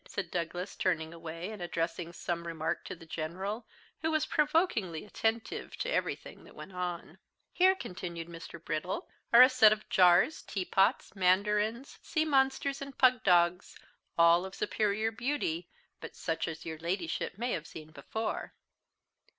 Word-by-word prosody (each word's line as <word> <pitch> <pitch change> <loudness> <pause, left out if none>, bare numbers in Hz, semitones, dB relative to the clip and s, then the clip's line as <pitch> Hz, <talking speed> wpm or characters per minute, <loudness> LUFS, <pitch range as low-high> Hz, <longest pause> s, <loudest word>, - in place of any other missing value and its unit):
said 200 - -5
Douglas, 175 +2 -3
turning 160 -3 -1
away, 165 +3 -6
and 210 -4 -8
addressing 170 0 -2
some 170 0 -4
remark 160 -1 -2
to - - -6
the 165 -1 -14
General, 190 +8 -4 0.3
who 320 - 0
was 310 -1 +1
provokingly 270 - +1
attentive 225 +2 -2
to - - -2
everything - - -3
that - - -16
went - - -9
on. 180 -1 -5 0.3
"Here," 375 +1 +5
continued 170 - -6
Mr. 170 0 -9
Brittle, 160 +3 -3 0.2
"are 235 +2 +10
a - - +9
set 225 -5 +6
of 215 0 -2
jars, 180 - +5
teapots, 195 +4 +1
mandarins, 210 +6 +1
sea 315 -1 0
monsters, 275 -1 +1
and 275 0 -7
pug 255 -2 +4
dogs, 175 -1 +3 0.4
all 170 +1 +6
of 190 0 -7
superior 215 +1 0
beauty, 225 - -2 0.3
but - - -9
such 165 -1 -2
as 160 -1 -6
your 160 -1 -5
Ladyship 170 +1 -3
may 240 +3 -1
have 165 0 -3
seen 155 0 -10
before." 220 +7 -4
185 Hz, 150 wpm, -31 LUFS, 170-225 Hz, 0.4 s, are